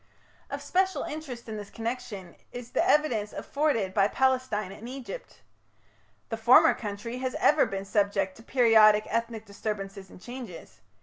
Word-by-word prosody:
Of - - -5
special 375 +1 +1
interest 285 -7 -7
in 220 -1 -5
this 205 -1 -8
connection 225 -6 -6 0.2
is 245 0 -8
the - - +2
evidence 290 - +2
afforded 280 -11 -1
by 200 -1 +4
Palestine 255 -5 0
and 225 +4 -9
Egypt. 270 - -9 0.9
The 225 - -3
former 235 +3 +6
country 215 +3 -6
has 260 0 -3
ever 300 0 +4
been 195 0 -5
subject 195 -2 0
to - - -13
periodic 220 -4 +5
ethnic 230 -1 -2
disturbances 200 -2 -5
and - - -14
changes. 220 - -10
225 Hz, 145 wpm, -28 LUFS, 200-255 Hz, 0.9 s, former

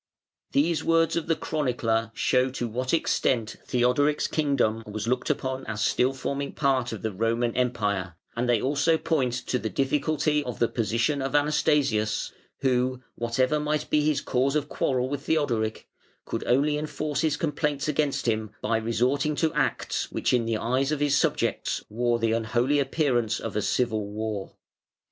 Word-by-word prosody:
] - - -67
These 155 +4 +2
words 165 0 +3
of 170 -1 -2
the 165 - +2
chronicler 120 -8 -1
show 130 +1 +2
to 125 -2 -3
what 125 +3 -2
extent 120 -8 +1
Theodoric's 130 +4 +2
kingdom 140 -7 +1
was 105 +1 -4
looked 125 +2 0
upon 130 -2 -1
as 105 -2 -2
still 125 +2 +2
forming 140 +1 -4
part 130 -4 +1
of 110 - -6
the 110 - -1
Roman 115 +3 0
Empire, 105 -8 -1 0.2
and 120 +1 -1
they 120 -2 +4
also 145 +6 +2
point 150 -7 0
to 125 - 0
the 110 - -3
difficulty 150 - +1
of 125 -5 -5
the 120 - +2
position 115 +6 0
of 135 +1 -2
Anastasius, 145 -7 +1 0.3
who, 130 -1 +1
whatever 130 +5 0
might 150 0 -2
be 150 - +4
his 150 -1 +1
cause 135 +3 0
of 150 -1 0
quarrel 130 -1 0
with 140 +1 -3
Theodoric, 120 -9 0 0.4
could - - -3
only 145 +4 +2
enforce 150 -1 -2
his 155 -2 +1
complaints 150 -2 -1
against 145 -3 0
him 110 -1 0
by 115 +1 0
resorting 125 +7 0
to 160 +1 +1
acts - - -1
which - - 0
in 120 -2 +2
the 115 -1 0
eyes 130 +5 0
of 150 - 0
his 145 -1 +2
subjects - - 0
wore 120 +2 +1
the 115 -1 +1
unholy 120 +5 +1
appearance 135 -5 +1
of - - -5
a 105 - +1
civil 110 -1 0
war. 105 -1 -4
130 Hz, 170 wpm, -26 LUFS, 115-145 Hz, 0.4 s, they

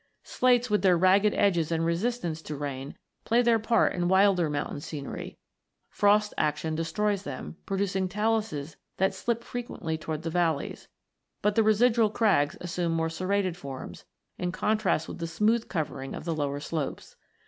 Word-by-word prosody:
Slates, 250 -1 +2
with 210 -3 +1
their 180 -2 +4
ragged 195 +4 +4
edges 170 -5 +2
and 165 0 +1
resistance 170 -2 -1
to 150 - -6
rain, 140 -1 -5 0.3
play 240 +2 +3
their 230 -1 +4
part 230 +2 +2
in 175 -1 0
wilder 190 -3 +4
mountain 145 0 -3
scenery. 145 -1 -7 0.5
Frost 210 +1 +3
action 155 +1 0
destroys 190 +6 0
them, 145 -1 -7
producing 195 -1 -1
taluses 210 -7 -1 0.2
that 190 +1 +2
slip 235 +4 -2
frequently 185 -11 -4
towards 155 0 -4
the 165 - -3
valleys; 165 -4 -1 0.6
but 210 0 +3
the 225 - +4
residual 220 +1 +4
crags 200 -10 +2
assume 175 -1 -2
more 165 0 0
serrated 185 +1 -1
forms, 135 -7 -8 0.3
in 180 0 -1
contrast 195 -3 0
with - - -7
the 165 - -3
smooth 215 +8 +1
covering 140 -6 -3
of - - -8
the 165 - -1
lower 145 -2 -2
slopes. 150 -1 -4
180 Hz, 160 wpm, -28 LUFS, 160-210 Hz, 0.6 s, their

